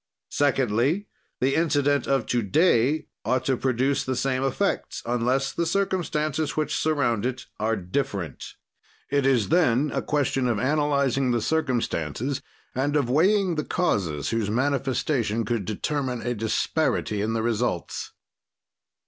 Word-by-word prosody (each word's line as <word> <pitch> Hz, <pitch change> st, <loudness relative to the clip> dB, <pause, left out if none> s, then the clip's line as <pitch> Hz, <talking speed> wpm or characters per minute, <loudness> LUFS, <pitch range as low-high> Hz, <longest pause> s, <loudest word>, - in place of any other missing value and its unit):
"Secondly, 135 Hz, -, +1 dB, 0.3 s
the 135 Hz, +2 st, +2 dB
incident 145 Hz, -3 st, +2 dB
of 135 Hz, -4 st, +1 dB
to 120 Hz, +1 st, 0 dB
day 150 Hz, -, +2 dB, 0.2 s
ought 130 Hz, 0 st, 0 dB
to 135 Hz, -, +2 dB
produce 130 Hz, +2 st, +1 dB
the 130 Hz, -, -2 dB
same 130 Hz, +1 st, 0 dB
effects, 135 Hz, -2 st, -1 dB
unless 125 Hz, +3 st, +1 dB
the 170 Hz, -, -1 dB
circumstances 160 Hz, -6 st, -1 dB
which 155 Hz, -2 st, 0 dB
surround 135 Hz, -9 st, +1 dB
it 130 Hz, +1 st, -3 dB
are 110 Hz, +1 st, +1 dB
different. 95 Hz, -, -4 dB, 0.6 s
"It 140 Hz, -1 st, +2 dB
is 125 Hz, -7 st, +2 dB
then 150 Hz, -4 st, +3 dB
a -, -, 0 dB
question 135 Hz, -3 st, 0 dB
of 120 Hz, -3 st, +1 dB
analyzing 140 Hz, -1 st, +1 dB
the 120 Hz, -1 st, +2 dB
circumstances 125 Hz, -, -1 dB, 0.3 s
and 140 Hz, +3 st, 0 dB
of 135 Hz, -5 st, +1 dB
weighing 190 Hz, +5 st, +3 dB
the 155 Hz, -1 st, -1 dB
causes 85 Hz, -, -1 dB
whose 115 Hz, -3 st, 0 dB
manifestation 130 Hz, -2 st, 0 dB
could 110 Hz, -3 st, -1 dB
determine 125 Hz, +4 st, -2 dB
a 120 Hz, -, 0 dB
disparity 110 Hz, -1 st, 0 dB
in 110 Hz, +2 st, -1 dB
the 115 Hz, -1 st, -1 dB
results. 115 Hz, -6 st, -2 dB
130 Hz, 135 wpm, -25 LUFS, 115-145 Hz, 0.6 s, then